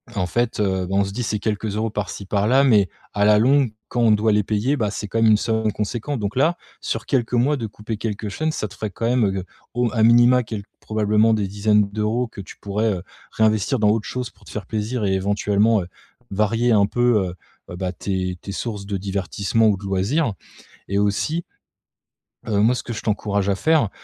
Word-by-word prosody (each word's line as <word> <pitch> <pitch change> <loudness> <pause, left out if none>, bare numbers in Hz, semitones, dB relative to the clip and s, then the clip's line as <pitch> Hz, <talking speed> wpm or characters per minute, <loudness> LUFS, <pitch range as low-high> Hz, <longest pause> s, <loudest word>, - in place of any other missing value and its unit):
en 95 -3 0
fait, 120 +5 -1
heu, 95 -2 0
bah, 95 - -2
on 100 - +4
se 100 - -4
dit: 120 +4 -3
«C'est 105 -1 -1
quelques 105 0 -2
euros 110 +1 -1
par-ci 100 -2 -5
par-là, 105 +8 +3
mais 105 -8 +4 0.2
à 100 0 +2
la 105 0 +6
longue, 130 0 +3 0.2
quand 120 - -1
on 115 -2 +5
doit 105 +1 +3
les 105 -1 +3
payer, 110 +8 0
bah, 105 -5 0
c'est 105 0 -5
quand 115 +3 -1
même 110 -1 +6
une 105 - +6
somme 110 -1 0
conséquente» 115 +6 -3
donc 100 +2 -3
là, 160 +6 +2 0.2
sur - - -3
quelques 125 -3 0
mois 135 +5 +2
de 115 - -3
couper 105 +1 -6
quelques 105 -1 -4
chaînes, 155 +10 -1
ça 110 - -3
te 100 - -14
ferait 110 - -4
quand 115 - -4
même, 120 -1 +3
heu, 95 - -4 0.3
au 120 +1 +1
m - - +1
à 110 - +2
minima 120 +2 +6
quel 110 -2 -6 0.2
probablement 110 +1 +2
des 105 -3 0
dizaines 105 +1 +2
d'euros 110 +4 -1
que 115 -3 -9
tu 95 - -12
pourrais, 105 +2 -1
heu, 90 - -5 0.3
réinvestir 110 +3 +1
dans 105 -1 +4
autre 105 0 0
chose 125 -1 -4
pour - - -25
te - - -12
faire 105 - -5
plaisir 110 +1 -2
et 95 - +1
éventuellement, 100 +2 +2
heu, 85 - -7 0.4
varier 115 +4 +1
un 100 -2 +5
peu, 105 -5 +1 0.4
heu, 85 - -6
bah, 90 -1 -3
tes 90 -1 -3
tes 100 - -7
sources 100 -1 -4
de 100 -1 -2
divertissement 100 +3 0
ou 100 - +1
de 100 - -13
loisirs 105 +7 0 0.5
et 100 - -1
aussi 105 +12 0 1.0
heu, 100 -2 +1
moi 120 +3 +4
ce - - -4
que 120 - -6
je - - -6
t'encourage 100 -2 -1
à - - +2
faire, 145 +1 +2
105 Hz, 225 wpm, -22 LUFS, 100-115 Hz, 1.0 s, la